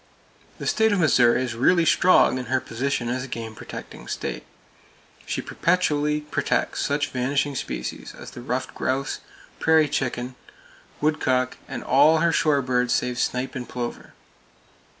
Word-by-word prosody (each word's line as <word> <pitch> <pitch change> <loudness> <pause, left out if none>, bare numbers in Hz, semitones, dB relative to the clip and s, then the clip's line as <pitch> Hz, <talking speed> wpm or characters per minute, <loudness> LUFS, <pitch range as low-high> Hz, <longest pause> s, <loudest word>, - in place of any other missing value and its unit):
The - - -7
state 220 0 +3
of 205 - +2
Missouri 130 -6 +4
is 120 -2 -3
really 165 +9 +3
strong 170 -6 +4
in 125 - -5
her 130 +2 +1
position 125 0 -2
as 125 +1 -2
a - - -6
game 115 -3 -6
protecting - - -9
state. - - -4 0.8
She - - -2
perpetually 150 -4 +1
protects 150 - -1
such 145 0 0
vanishing 135 +3 0
species 60 - -5
as - - -10
the 120 - -9
ruffed 130 +1 -3
grouse, 135 +1 -2 0.4
prairie 160 -1 +4
chicken 130 -3 -2
(pinnated 130 - -18
grouse), - - -25
woodcock, 130 -4 +1
and - - -6
all 145 +5 +5
her 170 +1 +3
shore 145 -4 +2
birds 125 -1 +1
save 125 0 -1
snipe 125 +1 -1
and 130 -3 -6
plover. 120 -1 -5
130 Hz, 155 wpm, -24 LUFS, 125-150 Hz, 0.8 s, all